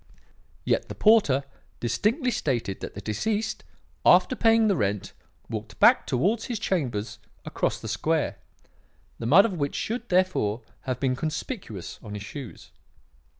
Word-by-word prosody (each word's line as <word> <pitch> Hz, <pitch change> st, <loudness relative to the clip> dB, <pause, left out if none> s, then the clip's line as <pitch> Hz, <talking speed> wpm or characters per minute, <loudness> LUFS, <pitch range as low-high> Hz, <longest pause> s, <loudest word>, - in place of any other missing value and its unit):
Yet -, -, 0 dB
the -, -, -6 dB
porter 205 Hz, -12 st, +4 dB, 0.4 s
distinctly 235 Hz, -, 0 dB
stated 120 Hz, -, -2 dB
that -, -, -7 dB
the 100 Hz, -, -6 dB
deceased, 205 Hz, -, -2 dB, 0.4 s
after -, -, +5 dB
paying 225 Hz, -1 st, +4 dB
the 200 Hz, -, +3 dB
rent, 100 Hz, -3 st, -1 dB, 0.3 s
walked 110 Hz, -1 st, -6 dB
back -, -, +6 dB
towards 195 Hz, -, +1 dB
his 240 Hz, -3 st, -3 dB
chambers 130 Hz, -, -2 dB, 0.3 s
across -, -, -1 dB
the -, -, -7 dB
square; -, -, -1 dB, 0.8 s
the 115 Hz, -, -3 dB
mud 175 Hz, -, +7 dB
of 225 Hz, -, -1 dB
which 145 Hz, -5 st, -2 dB
should, 235 Hz, +2 st, -3 dB
therefore, 180 Hz, -, +1 dB, 0.2 s
have 130 Hz, -2 st, -2 dB
been 130 Hz, -2 st, +1 dB
conspicuous 155 Hz, -, -5 dB
on 105 Hz, -2 st, -8 dB
his 105 Hz, -, -6 dB
shoes. 135 Hz, +2 st, -9 dB
140 Hz, 145 wpm, -26 LUFS, -, 0.8 s, mud